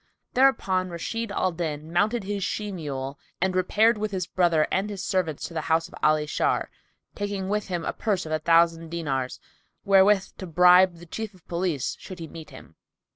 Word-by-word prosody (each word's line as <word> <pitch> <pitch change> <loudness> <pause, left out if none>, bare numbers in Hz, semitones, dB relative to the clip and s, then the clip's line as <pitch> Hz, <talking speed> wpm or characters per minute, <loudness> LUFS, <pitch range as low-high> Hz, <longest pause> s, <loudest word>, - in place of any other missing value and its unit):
Thereupon 195 -9 +2
Rashid 205 +6 -4
al 185 -2 0
Din 160 -2 -4
mounted 215 +5 +1
his 200 0 -3
she 210 +1 -2
mule 140 -6 -5 0.2
and 185 +1 0
repaired 215 +4 +3
with 215 0 -1
his 185 -3 -2
brother 170 -4 +2
and 195 +2 0
his 200 -3 -5
servants 170 -6 -1
to - - -12
the 165 - -2
house 165 +1 +2
of - - -19
Ali 155 0 +3
Shar, 150 - 0 0.4
taking 200 -2 -3
with 210 0 -1
him 175 -3 -3
a - - -2
purse 200 -6 -1
of 155 - -7
a 155 - +1
thousand 165 +1 +3
dinars, 140 -6 -3 0.5
wherewith 195 0 +5
to 185 - -6
bribe 180 +2 +6
the 170 +1 -13
Chief 215 +4 -6
of 180 - -23
Police, 170 -6 -1
should 185 - -9
he 165 -2 -7
meet 160 0 -10
him. - - -14
180 Hz, 190 wpm, -25 LUFS, 165-200 Hz, 0.5 s, bribe